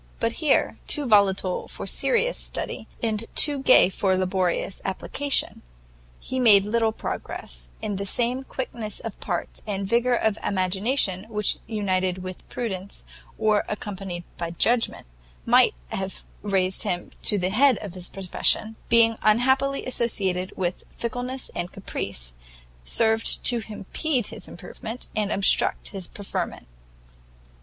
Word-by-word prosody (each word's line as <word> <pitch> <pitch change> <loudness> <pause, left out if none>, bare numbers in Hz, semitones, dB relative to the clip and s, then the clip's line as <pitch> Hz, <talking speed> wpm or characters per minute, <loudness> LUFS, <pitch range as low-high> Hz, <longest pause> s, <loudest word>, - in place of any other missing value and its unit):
But 230 - +1
here, 300 -3 +2
too 295 - +2
volatile 195 -4 +3
for - - -7
serious 485 +1 +1
study, 220 - -3 0.2
and 220 -1 0
too 290 -2 +5
gay 255 - +7
for 190 -1 +1
laborious 185 0 0
application, 275 +8 0 0.6
he 260 - -3
made 205 -5 +7
little 225 +1 +2
progress: - - -6
and 205 -2 -2
the 200 - -2
same 245 +5 0
quickness 235 -5 -5
of 225 -4 -7
parts 175 -3 -4
and 195 -1 -2
vigour 240 +3 +3
of 220 -2 +1
imagination 190 +1 +1
which 210 -2 +1
united 185 -4 -1
with 185 0 -8
prudence, 200 -5 -5 0.3
or 215 -1 +3
accompanied 195 -4 -5
by 170 -1 -3
judgment, 230 +8 +1 0.4
might - - +5
have 190 0 -5 0.2
raised 190 -2 +1
him 175 0 -2
to 210 - +3
the 185 0 0
head 255 +2 +5
of 200 -4 -7
his 180 -1 -8
profession, 195 +3 0
being 230 -1 +5
unhappily 265 +5 +3
associated 195 -7 -1
with 180 -1 -2
fickleness 245 +2 -3
and 175 - -4
caprice, - - -4 0.5
served 220 - +2
only 235 - 0
to - - -10
impede 245 - -1
his - - -9
improvement, 230 +1 -8
and 210 -1 0
obstruct 195 -2 +2
his 190 -4 -6
preferment. 200 - -5
210 Hz, 135 wpm, -25 LUFS, 190-235 Hz, 0.6 s, gay